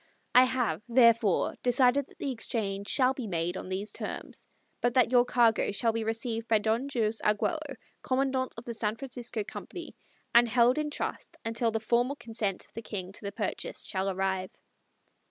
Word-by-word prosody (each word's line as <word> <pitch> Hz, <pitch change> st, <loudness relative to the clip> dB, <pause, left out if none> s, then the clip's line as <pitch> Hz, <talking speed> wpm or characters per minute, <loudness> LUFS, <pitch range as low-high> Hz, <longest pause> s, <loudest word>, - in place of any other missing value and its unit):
I 250 Hz, +1 st, +8 dB
have, 255 Hz, -4 st, -1 dB
therefore, 230 Hz, -5 st, +4 dB
decided 250 Hz, +2 st, +3 dB
that -, -, -20 dB
the 275 Hz, -, -2 dB
exchange 205 Hz, -4 st, -2 dB
shall 255 Hz, 0 st, +3 dB
be 255 Hz, -4 st, -5 dB
made 175 Hz, -1 st, -1 dB
on 185 Hz, -, -6 dB
these 195 Hz, +3 st, -3 dB
terms, -, -, -6 dB, 0.3 s
but 240 Hz, +1 st, +1 dB
that 250 Hz, -2 st, +4 dB
your 245 Hz, -1 st, +5 dB
cargo 235 Hz, -4 st, +3 dB
shall 225 Hz, +3 st, +1 dB
be 230 Hz, 0 st, -1 dB
received 225 Hz, +1 st, -2 dB
by 225 Hz, -, +4 dB
Don 225 Hz, +6 st, 0 dB
Jose 225 Hz, -3 st, 0 dB
Arguello, 275 Hz, +7 st, 0 dB, 0.3 s
Commandante 260 Hz, 0 st, 0 dB
of 230 Hz, -, -8 dB
the 235 Hz, -, -4 dB
San 220 Hz, -1 st, 0 dB
Francisco 245 Hz, -3 st, -4 dB
Company, -, -, -8 dB, 0.4 s
and 235 Hz, 0 st, +7 dB
held 245 Hz, +4 st, +4 dB
in 305 Hz, 0 st, -1 dB
trust 295 Hz, -, -5 dB
until 230 Hz, +1 st, +1 dB
the 225 Hz, 0 st, -1 dB
formal 240 Hz, +5 st, +1 dB
consent 220 Hz, -7 st, -3 dB
of -, -, -26 dB
the 230 Hz, -, -6 dB
King 190 Hz, -4 st, -5 dB
to -, -, -10 dB
the 200 Hz, -, -4 dB
purchase 205 Hz, -1 st, -4 dB
shall 190 Hz, 0 st, -2 dB
arrive." 190 Hz, 0 st, -1 dB
230 Hz, 180 wpm, -29 LUFS, 210-250 Hz, 0.4 s, I